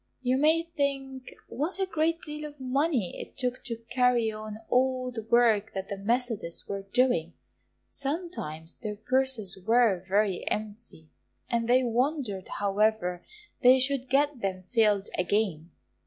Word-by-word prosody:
You 255 Hz, 0 st, +2 dB
may 315 Hz, +4 st, +4 dB
think 275 Hz, -5 st, -3 dB
what 310 Hz, +9 st, -3 dB
a 385 Hz, -, +1 dB
great 330 Hz, -1 st, 0 dB
deal 300 Hz, 0 st, -5 dB
of 290 Hz, -1 st, -18 dB
money 260 Hz, -, 0 dB
it -, -, -11 dB
took 250 Hz, -1 st, -2 dB
to 230 Hz, -3 st, -4 dB
carry 250 Hz, -3 st, +3 dB
on 215 Hz, 0 st, -7 dB
all 255 Hz, 0 st, +1 dB
the 230 Hz, -2 st, -5 dB
work 225 Hz, -2 st, +3 dB
that 190 Hz, 0 st, -5 dB
the 200 Hz, -, -4 dB
Methodists 225 Hz, -5 st, -1 dB
were 200 Hz, 0 st, -3 dB
doing; 240 Hz, -10 st, +2 dB, 0.5 s
sometimes 275 Hz, -, -3 dB
their 210 Hz, -2 st, -5 dB
purses 230 Hz, -3 st, 0 dB
were 225 Hz, -3 st, +4 dB
very 195 Hz, 0 st, +1 dB
empty, 210 Hz, -7 st, -5 dB, 0.4 s
and 235 Hz, -1 st, 0 dB
they 255 Hz, +1 st, +5 dB
wondered 245 Hz, -4 st, -1 dB
however 200 Hz, -3 st, +1 dB, 0.4 s
they 255 Hz, +1 st, +7 dB
should 265 Hz, 0 st, 0 dB
get 280 Hz, -1 st, +2 dB
them 185 Hz, -1 st, -2 dB
filled 210 Hz, -4 st, +3 dB
again. 180 Hz, -4 st, 0 dB
240 Hz, 140 wpm, -28 LUFS, 205-265 Hz, 0.5 s, they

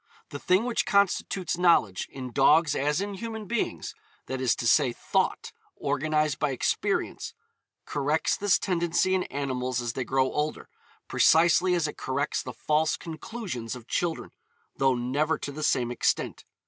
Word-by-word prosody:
The 145 Hz, -, -7 dB
thing 185 Hz, +7 st, +2 dB
which 245 Hz, -1 st, -1 dB
constitutes 195 Hz, -2 st, +1 dB
knowledge, 165 Hz, -, +3 dB
in 130 Hz, -2 st, -7 dB
dogs 150 Hz, +4 st, +4 dB
as 150 Hz, +5 st, 0 dB
in 200 Hz, 0 st, -3 dB
human 220 Hz, +2 st, -6 dB
beings 235 Hz, +3 st, -3 dB, 0.3 s
that 130 Hz, 0 st, -4 dB
is 125 Hz, -2 st, +2 dB
to 120 Hz, -, -2 dB
say, 120 Hz, -, +4 dB
thought, -, -, -1 dB, 0.3 s
organised 150 Hz, +1 st, 0 dB
by -, -, +1 dB
experience 130 Hz, -, -1 dB, 0.5 s
corrects 150 Hz, +2 st, 0 dB
this 205 Hz, -1 st, +3 dB
tendency 175 Hz, 0 st, 0 dB
in 185 Hz, -1 st, +1 dB
animals 130 Hz, -2 st, -2 dB
as 120 Hz, -1 st, -3 dB
they 130 Hz, -, -2 dB
grow 130 Hz, +1 st, +1 dB
older, 150 Hz, +1 st, -3 dB, 0.4 s
precisely 170 Hz, +3 st, +4 dB
as 165 Hz, -3 st, +1 dB
it 150 Hz, -, -7 dB
corrects 140 Hz, +2 st, -2 dB
the 125 Hz, -, -7 dB
false 150 Hz, +6 st, 0 dB
conclusions 160 Hz, -, -6 dB
of 120 Hz, -1 st, -12 dB
children, 170 Hz, -2 st, -2 dB, 0.4 s
though 135 Hz, -1 st, +2 dB
never 140 Hz, +6 st, 0 dB
to 145 Hz, -, -6 dB
the 150 Hz, +2 st, -7 dB
same 125 Hz, -5 st, +1 dB
extent. 120 Hz, -, -1 dB
150 Hz, 155 wpm, -27 LUFS, 130-175 Hz, 0.5 s, dogs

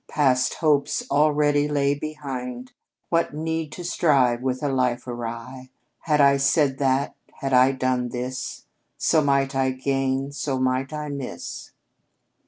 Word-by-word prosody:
Past 130 Hz, -4 st, +2 dB
hopes 150 Hz, -4 st, +1 dB
already 145 Hz, 0 st, +3 dB
lay 140 Hz, -1 st, +1 dB
behind. 130 Hz, -4 st, -6 dB, 0.4 s
What 165 Hz, -3 st, +1 dB
need 160 Hz, 0 st, -3 dB
to 175 Hz, -, -7 dB
strive 135 Hz, -8 st, +2 dB
with 130 Hz, +1 st, -2 dB
a -, -, +1 dB
life 125 Hz, -2 st, 0 dB
awry? 120 Hz, +2 st, -6 dB, 0.3 s
Had 150 Hz, -2 st, +1 dB
I 140 Hz, -1 st, +6 dB
said 140 Hz, 0 st, +2 dB
that, 135 Hz, 0 st, +1 dB, 0.2 s
had 135 Hz, -1 st, -4 dB
I 130 Hz, +1 st, +6 dB
done 130 Hz, -2 st, 0 dB
this, 125 Hz, +1 st, -5 dB, 0.3 s
So 160 Hz, -, +3 dB
might 140 Hz, -1 st, +1 dB
I 135 Hz, -1 st, +1 dB
gain, 135 Hz, +1 st, -1 dB
so 140 Hz, -2 st, -2 dB
might 130 Hz, +1 st, 0 dB
I 150 Hz, -1 st, -4 dB
miss." 140 Hz, -3 st, -7 dB
135 Hz, 140 wpm, -24 LUFS, 130-145 Hz, 0.4 s, I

